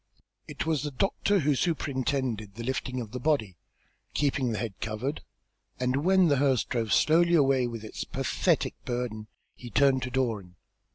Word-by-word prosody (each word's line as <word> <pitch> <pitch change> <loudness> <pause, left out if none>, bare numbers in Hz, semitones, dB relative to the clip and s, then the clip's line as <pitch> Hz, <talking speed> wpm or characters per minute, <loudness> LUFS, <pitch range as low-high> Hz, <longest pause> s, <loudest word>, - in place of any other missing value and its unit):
It - - -4
was 160 -3 +1
the 150 - -2
doctor 195 +6 +1
who 145 0 +2
superintended 130 - -1
the 115 - -6
lifting 130 0 -2
of 110 -3 -8
the 125 - -4
body, 120 - 0 0.6
keeping 135 -4 +1
the 110 - -2
head 115 -3 -3
covered, 115 +7 -3 0.6
and 125 +1 +1
when 190 0 +5
the 145 -3 +3
hearse 135 -3 +3
drove 115 -3 -2
slowly 170 +2 +4
away 135 -4 +3
with 115 -2 -6
its 110 - -5
pathetic - - 0
burden, 120 -3 -3 0.3
he 120 - -10
turned 130 +4 +3
to 125 - -3
Doran. 115 -9 -2
130 Hz, 165 wpm, -28 LUFS, 115-145 Hz, 0.6 s, when